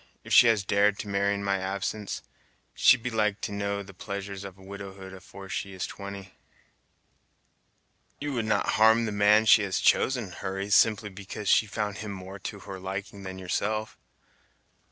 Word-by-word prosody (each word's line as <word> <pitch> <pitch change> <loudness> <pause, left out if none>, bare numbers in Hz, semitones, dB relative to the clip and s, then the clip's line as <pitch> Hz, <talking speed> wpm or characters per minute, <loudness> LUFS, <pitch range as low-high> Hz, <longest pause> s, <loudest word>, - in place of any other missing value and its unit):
If - - -4
she 120 - +8
has 110 -3 +3
dared 100 +1 +3
to 105 - -9
marry 100 0 +1
in 100 - -4
my 100 -1 0
absence, 100 +2 -3 0.5
she'd 115 - +5
be 125 - -2
like 105 -2 0
to - - -3
know 100 0 -2
the 100 0 -13
pleasures 100 0 -6
of 95 -1 -9
widowhood 95 0 -9
afore 95 +1 -11
she 100 0 -4
is 95 - -3
twenty!" 100 -1 -8 1.9
"You 145 -1 -3
would 115 -3 -1
not 105 -2 +1
harm 110 +1 +6
the 110 - -2
man 105 +2 +4
she 110 - +7
has 100 -2 -1
chosen, 125 -8 +2
Hurry, 95 +2 -5
simply 105 0 +4
because 100 +1 -6
she 110 - +4
found 105 -1 -3
him 105 -2 -5
more 95 +1 -9
to 100 +1 -7
her 95 -1 -8
liking 95 +2 -6
than 95 -1 -7
yourself!" 105 +4 -2
100 Hz, 175 wpm, -27 LUFS, 95-105 Hz, 1.9 s, she